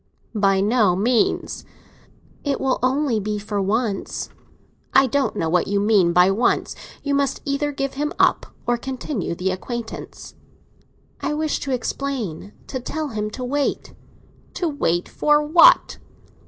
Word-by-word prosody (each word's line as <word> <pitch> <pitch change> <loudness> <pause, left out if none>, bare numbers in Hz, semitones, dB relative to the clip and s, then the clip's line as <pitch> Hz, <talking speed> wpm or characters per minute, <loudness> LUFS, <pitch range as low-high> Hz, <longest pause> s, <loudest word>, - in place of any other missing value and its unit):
"By 195 -3 +2
no 210 -3 +3
means." 225 +4 0 0.8
"It 280 -2 -1
will 265 -1 0
only 260 -2 +1
be 210 +1 -2
for 205 0 -3
once." 205 +1 -2 0.7
"I 270 - +7
don't 275 0 0
know 165 - -1
what 175 +2 +1
you 200 0 +1
mean 200 -4 +3
by 180 +2 +5
once. 230 +5 +1 0.3
You 285 -1 -1
must 280 -1 +1
either 290 +1 -1
give 275 -1 -3
him 295 +2 -2
up - - +3 0.2
or 240 0 +1
continue 255 - -4
the 185 +2 -1
acquaintance." 230 +5 -6 0.9
"I 300 - -1
wish 310 0 -1
to 275 - -4
explain—to 250 - -4
tell 305 +4 -4
him 210 -3 -3
to 250 +4 -7
wait." 280 +3 -2 0.6
"To 350 - -1
wait 175 - 0
for 295 0 +2
what?" 345 +12 +5
240 Hz, 140 wpm, -22 LUFS, 200-280 Hz, 0.9 s, I